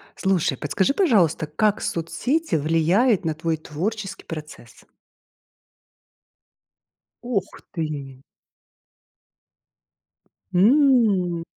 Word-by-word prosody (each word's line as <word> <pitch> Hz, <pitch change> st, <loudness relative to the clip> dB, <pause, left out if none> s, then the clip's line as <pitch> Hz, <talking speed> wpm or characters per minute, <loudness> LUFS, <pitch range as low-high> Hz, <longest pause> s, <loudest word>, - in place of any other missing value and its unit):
Слушай, 185 Hz, -8 st, 0 dB
подскажи, 155 Hz, -, 0 dB
пожалуйста, 190 Hz, -, +2 dB
как 205 Hz, +7 st, 0 dB
соцсети 245 Hz, -, -1 dB
влияют 170 Hz, -, +2 dB
на 160 Hz, -, 0 dB
твой 160 Hz, +1 st, -2 dB
творческий 195 Hz, +7 st, -5 dB
процесс? 150 Hz, -7 st, -10 dB, 2.4 s
Ох 220 Hz, -6 st, -3 dB
ты! 145 Hz, -6 st, -5 dB, 2.3 s
М. 205 Hz, -, +3 dB
175 Hz, 65 wpm, -23 LUFS, 155-215 Hz, 2.4 s, М